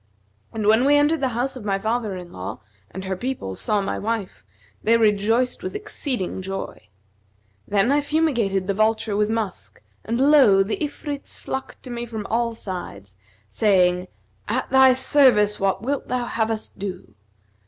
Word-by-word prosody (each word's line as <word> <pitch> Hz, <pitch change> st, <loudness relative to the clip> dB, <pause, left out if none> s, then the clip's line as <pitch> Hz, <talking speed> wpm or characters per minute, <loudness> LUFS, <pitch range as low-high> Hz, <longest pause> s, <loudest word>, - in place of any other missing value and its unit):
And 220 Hz, -2 st, -3 dB
when 220 Hz, +3 st, +5 dB
we 290 Hz, +1 st, +5 dB
entered 295 Hz, +2 st, +3 dB
the 265 Hz, -, +2 dB
house 260 Hz, +3 st, -1 dB
of 255 Hz, -, -8 dB
my 200 Hz, -2 st, 0 dB
father 220 Hz, 0 st, -2 dB
in 180 Hz, -1 st, -10 dB
law 90 Hz, 0 st, -6 dB, 0.3 s
and 190 Hz, +1 st, -7 dB
her 190 Hz, 0 st, -2 dB
people 240 Hz, -, -4 dB
saw 210 Hz, -, 0 dB
my 195 Hz, -, -3 dB
wife, 220 Hz, -3 st, -3 dB, 0.4 s
they 230 Hz, +2 st, +4 dB
rejoiced 225 Hz, -, +2 dB
with 375 Hz, +2 st, -5 dB
exceeding 275 Hz, -, -3 dB
joy. 195 Hz, -, -6 dB, 0.8 s
Then 205 Hz, +5 st, +2 dB
I 290 Hz, +1 st, +3 dB
fumigated 245 Hz, -, 0 dB
the 200 Hz, -, 0 dB
vulture 215 Hz, 0 st, +1 dB
with 210 Hz, +1 st, +1 dB
musk 220 Hz, -4 st, -4 dB, 0.2 s
and 230 Hz, +2 st, -2 dB
lo! 265 Hz, -9 st, +6 dB
the 200 Hz, -, -3 dB
Ifrits 290 Hz, -1 st, -5 dB
flocked 265 Hz, -, -6 dB
to 255 Hz, -, -8 dB
me 240 Hz, 0 st, -4 dB
from 220 Hz, -3 st, -6 dB
all 230 Hz, 0 st, 0 dB
sides, 140 Hz, -, -8 dB, 0.3 s
saying, 180 Hz, -, +2 dB, 0.4 s
'At -, -, -2 dB
thy 265 Hz, -1 st, +6 dB
service 250 Hz, -6 st, +4 dB
what 195 Hz, +1 st, 0 dB
wilt 280 Hz, +3 st, -2 dB
thou 250 Hz, -1 st, -1 dB
have 225 Hz, -2 st, -1 dB
us 220 Hz, -1 st, -3 dB
do?' 190 Hz, -2 st, -7 dB
220 Hz, 165 wpm, -23 LUFS, 195-260 Hz, 0.8 s, lo